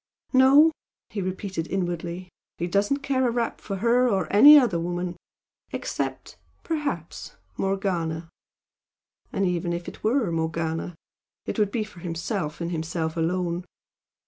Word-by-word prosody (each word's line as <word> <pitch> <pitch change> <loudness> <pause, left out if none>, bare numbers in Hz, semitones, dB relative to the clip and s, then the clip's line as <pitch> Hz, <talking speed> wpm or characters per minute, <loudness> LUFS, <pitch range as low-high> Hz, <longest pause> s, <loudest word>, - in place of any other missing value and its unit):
"No," 275 +5 +7 0.4
he 210 - -3
repeated 185 -2 -3
inwardly 175 -1 -3 0.3
"He 170 - -2
doesn't 205 +10 +1
care 260 -2 +1
a - - +2
rap 235 -1 -2
for 200 - -4
her 240 +5 +3
or 190 -5 +1
any 290 +9 +10
other 235 -12 +3
woman 175 +1 -3 0.6
except - - -4 0.2
perhaps 285 - -4 0.2
Morgana! 175 -4 -1 1.0
And 195 - 0
even 175 -1 -1
if 170 0 -5
it - - -9
were 225 -4 +2
Morgana, 165 +1 -2 0.5
it - - -3
would 210 -2 +3
be 225 -1 0
for 210 -4 -13
himself 170 -1 -3
and 170 0 -3
himself 160 0 -2
alone! 175 +1 -1
185 Hz, 135 wpm, -25 LUFS, 170-225 Hz, 1.0 s, any